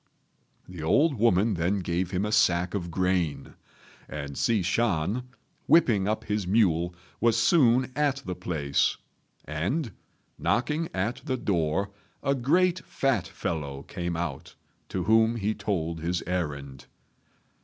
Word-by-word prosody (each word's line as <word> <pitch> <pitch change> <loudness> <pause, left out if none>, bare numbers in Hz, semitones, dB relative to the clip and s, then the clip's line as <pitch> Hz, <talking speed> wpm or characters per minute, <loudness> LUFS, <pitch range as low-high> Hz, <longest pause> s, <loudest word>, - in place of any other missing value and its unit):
The 90 -3 -9
old 140 - +3
woman 110 -1 +3
then 90 +3 0
gave 90 0 -1
him 95 +2 -1
a 105 - -2
sack 90 -3 +3
of 90 -4 -3
grain; 90 -3 -1 0.6
and 70 -2 -6
Hsi 110 +2 +1
Shan, 110 +4 0 0.4
whipping 115 - +4
up 110 +1 -1
his 105 -3 -2
mule, 90 -4 +2 0.2
was 115 0 +3
soon 125 0 +4
at 140 -2 0
the 90 - -3
place; 80 -6 0 0.5
and, 100 - -2 0.5
knocking 150 +6 0
at 100 +6 -2
the 130 -4 -1
door, 95 -2 0 0.3
a 140 - +2
great 170 +8 +2
fat 120 -10 0
fellow 70 -7 -4
came 85 -1 -4
out, 80 -6 -5 0.3
to 95 - -2
whom 110 +4 +4
he 110 -1 -1
told 85 -7 -2
his 85 +2 -2
errand. 70 -7 -4
95 Hz, 135 wpm, -27 LUFS, 85-115 Hz, 0.6 s, whipping